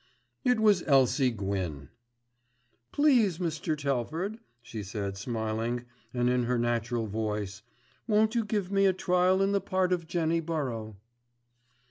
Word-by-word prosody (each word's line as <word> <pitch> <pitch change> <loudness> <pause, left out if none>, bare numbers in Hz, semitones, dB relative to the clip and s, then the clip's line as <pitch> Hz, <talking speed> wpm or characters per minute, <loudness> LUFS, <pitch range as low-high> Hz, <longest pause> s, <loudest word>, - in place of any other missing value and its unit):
It 250 -2 +3
was 210 -4 +4
Elsie 135 -1 +4
Gwyn. 95 - -3 1.0
"Please 245 - +3
Mr. 160 -2 -2
Telford," 150 - -2 0.2
she 110 -2 -6
said 100 0 -4
smiling, 115 +3 -2 0.3
and 120 -1 0
in 125 -1 +2
her 125 +1 +1
natural 120 0 0
voice, 105 -2 -3 0.5
"won't 215 0 +3
you 235 -2 +1
give 210 -3 -2
me 195 0 +4
a 190 - +3
trial 185 +1 +2
in 195 - +2
the 200 -1 +1
part 185 -1 +1
of 170 -2 -2
Jenny 165 -1 +1
Burrow." 130 -10 -3
140 Hz, 135 wpm, -29 LUFS, 110-185 Hz, 1.0 s, was